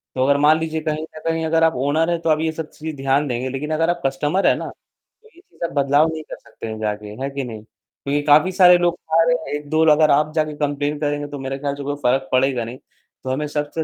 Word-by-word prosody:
तो 130 Hz, -, +1 dB
अगर 140 Hz, 0 st, +3 dB
मान 155 Hz, +1 st, +5 dB
लीजिए 160 Hz, 0 st, -3 dB
कहीं 155 Hz, 0 st, -2 dB
न 160 Hz, -, -10 dB
कहीं 165 Hz, 0 st, 0 dB
अगर 165 Hz, 0 st, +2 dB
आप 160 Hz, -, +4 dB
ओनर 145 Hz, +6 st, +1 dB
हैं, 170 Hz, -, 0 dB
तो 165 Hz, -, -1 dB
आप 155 Hz, -1 st, +3 dB
ये 160 Hz, 0 st, 0 dB
सब 160 Hz, -1 st, -6 dB
चीजें 160 Hz, 0 st, -7 dB
ध्यान 135 Hz, +2 st, +1 dB
देंगे, 125 Hz, 0 st, -2 dB
लेकिन 140 Hz, +4 st, -4 dB
अगर 165 Hz, +2 st, +1 dB
आप 175 Hz, 0 st, -1 dB
कस्टमर 145 Hz, +8 st, +1 dB
हैं -, -, +4 dB
ना, -, -, -5 dB
तो 445 Hz, -, -23 dB
ये -, -, -18 dB
चीज -, -, -29 dB
का -, -, +1 dB
बदलाव 145 Hz, +3 st, +3 dB
नहीं 160 Hz, -1 st, -6 dB
कर -, -, -6 dB
सकते -, -, -10 dB
हैं 110 Hz, -1 st, -6 dB
जाके, 105 Hz, -1 st, -3 dB, 0.2 s
है 135 Hz, -, -2 dB
कि 140 Hz, 0 st, -4 dB
नहीं? 110 Hz, -4 st, -8 dB
क्योंकि 140 Hz, +5 st, -5 dB
काफ़ी 150 Hz, +5 st, +5 dB
सारे 180 Hz, -1 st, +6 dB
लोग 175 Hz, -1 st, +1 dB
खा 165 Hz, +1 st, +1 dB
रहे 165 Hz, 0 st, +3 dB
हैं, 160 Hz, -2 st, -4 dB
1-2 150 Hz, +2 st, 0 dB
लोग 150 Hz, -1 st, +5 dB
अगर 155 Hz, -1 st, +5 dB
आप 150 Hz, +2 st, +2 dB
जाके 155 Hz, -1 st, 0 dB
कम्प्लेंन 145 Hz, 0 st, -2 dB
करेंगे 145 Hz, -1 st, -2 dB
तो 145 Hz, -1 st, -7 dB
मेरे 135 Hz, 0 st, -4 dB
ख़याल 140 Hz, 0 st, -2 dB
से 140 Hz, -, -7 dB
कोई 145 Hz, +1 st, -3 dB
फ़र्क 135 Hz, +2 st, +1 dB
पड़ेगा 130 Hz, -1 st, +2 dB
नहीं। 120 Hz, +3 st, -7 dB, 0.5 s
तो 130 Hz, -, -5 dB
हमें 145 Hz, +3 st, -1 dB
सबसे 150 Hz, +2 st, -3 dB
150 Hz, 270 wpm, -21 LUFS, 135-160 Hz, 0.5 s, सारे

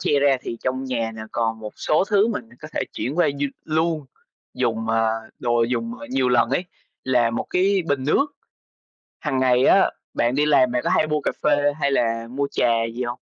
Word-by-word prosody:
tre 145 Hz, -, +2 dB
ra 140 Hz, -1 st, +4 dB
thì 115 Hz, -, -5 dB
trong 130 Hz, +1 st, -1 dB
nhà 115 Hz, -3 st, -2 dB
nè 110 Hz, -, -6 dB
còn 115 Hz, -1 st, -1 dB
một 105 Hz, -1 st, -7 dB
số 155 Hz, +5 st, +2 dB
thứ 205 Hz, +1 st, +3 dB
mình 230 Hz, +1 st, -4 dB
có 155 Hz, -, -9 dB
thể -, -, -1 dB
chuyển 130 Hz, -, -3 dB
qua 175 Hz, -, +4 dB
như 140 Hz, 0 st, -1 dB, 0.2 s
luôn 160 Hz, -2 st, 0 dB, 0.5 s
dùng, 115 Hz, -1 st, -1 dB
ờ, 115 Hz, 0 st, +2 dB, 0.3 s
đồ 120 Hz, -1 st, +1 dB
dùng, 230 Hz, -, -1 dB
ờ, 290 Hz, -, -8 dB
nhiều 130 Hz, -1 st, +1 dB
lần 120 Hz, -1 st, +3 dB
ấy, 140 Hz, +7 st, 0 dB, 0.4 s
là 120 Hz, -3 st, +2 dB
một 115 Hz, -, -3 dB
cái 190 Hz, +1 st, +2 dB
bình 135 Hz, -2 st, 0 dB
nước. 215 Hz, -, +3 dB, 0.9 s
Hằng 140 Hz, -4 st, -1 dB
ngày 130 Hz, 0 st, +3 dB
á, 195 Hz, -, +5 dB, 0.2 s
bạn 120 Hz, +2 st, +1 dB
đi 150 Hz, +1 st, +2 dB
làm 130 Hz, -4 st, +4 dB
bạn 125 Hz, -, 0 dB
có -, -, 0 dB
hay 155 Hz, -, +3 dB
mua 150 Hz, 0 st, 0 dB
cà -, -, -1 dB
phê 145 Hz, -1 st, +3 dB
hay 140 Hz, -, +2 dB
là 115 Hz, -2 st, 0 dB
mua 140 Hz, +2 st, -1 dB
trà 120 Hz, -, +1 dB, 0.3 s
gì 125 Hz, -, -3 dB
hông? 120 Hz, 0 st, -4 dB
130 Hz, 215 wpm, -22 LUFS, 120-150 Hz, 0.9 s, á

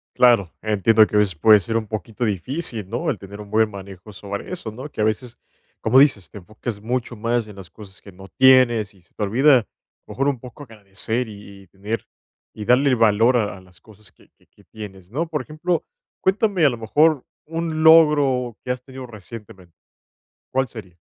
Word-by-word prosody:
Claro. 115 Hz, -8 st, +4 dB
Entiendo 110 Hz, +1 st, +3 dB
que -, -, -6 dB
a -, -, +5 dB
veces 100 Hz, -3 st, +1 dB
puede 105 Hz, +6 st, +6 dB
ser 115 Hz, +5 st, -4 dB
un 110 Hz, -2 st, -1 dB
poquito 110 Hz, +2 st, -5 dB
difícil, 110 Hz, -, -2 dB
¿no?, -, -, -3 dB
el -, -, -1 dB
tener 100 Hz, +1 st, -10 dB
un 105 Hz, -, -11 dB
buen 110 Hz, +1 st, +2 dB
manejo 100 Hz, +1 st, -11 dB
sobre 100 Hz, -, -7 dB
eso, 145 Hz, -11 st, -6 dB
¿no?, 130 Hz, +7 st, -9 dB
que -, -, -4 dB
a -, -, +3 dB
veces, 115 Hz, +3 st, -2 dB, 0.4 s
como 115 Hz, +4 st, +3 dB
dices, 130 Hz, -9 st, +4 dB
te -, -, -12 dB
enfocas 110 Hz, +3 st, -7 dB
mucho 120 Hz, +1 st, -3 dB
más 115 Hz, +1 st, -1 dB
en 105 Hz, -, -12 dB
las 95 Hz, -3 st, -12 dB
cosas 100 Hz, -2 st, -14 dB
que 100 Hz, -, -14 dB
no 95 Hz, +1 st, -13 dB
tienes 120 Hz, -4 st, +4 dB
y 95 Hz, -, -23 dB
se 85 Hz, -, -32 dB
te 105 Hz, -, -3 dB
olvida, 130 Hz, +7 st, +4 dB
a 105 Hz, -, -9 dB, 0.4 s
lo -, -, -10 dB
mejor 135 Hz, +1 st, 0 dB
un 140 Hz, -4 st, 0 dB
poco 125 Hz, +4 st, -11 dB
agradecer 110 Hz, +1 st, -4 dB
y 100 Hz, -2 st, -12 dB
y 95 Hz, -, -22 dB
tener 105 Hz, +5 st, -5 dB, 0.5 s
y 105 Hz, -, -7 dB
darle 130 Hz, +4 st, +4 dB
el 125 Hz, -, +3 dB
valor 115 Hz, +2 st, +3 dB
a 105 Hz, -3 st, -2 dB
a -, -, -14 dB
las 90 Hz, -1 st, -21 dB
cosas 105 Hz, -3 st, -16 dB
que -, -, -25 dB
que -, -, -30 dB
que -, -, -25 dB
tienes, 95 Hz, -4 st, -11 dB
¿no? 155 Hz, +8 st, -2 dB
Por 155 Hz, -2 st, -3 dB
ejemplo, 165 Hz, +3 st, -2 dB, 0.4 s
cuéntame, 195 Hz, -2 st, +1 dB
a 145 Hz, -, +6 dB
lo 120 Hz, -, -5 dB
mejor, 145 Hz, +6 st, +2 dB, 0.2 s
un 160 Hz, -1 st, -3 dB
logro 145 Hz, -7 st, +5 dB
que -, -, -9 dB
has 125 Hz, 0 st, -4 dB
tenido 130 Hz, -1 st, -10 dB
recientemente, 100 Hz, -5 st, -12 dB, 0.8 s
¿cuál 130 Hz, 0 st, 0 dB
sería? 95 Hz, -8 st, -11 dB
110 Hz, 210 wpm, -21 LUFS, 100-130 Hz, 0.8 s, puede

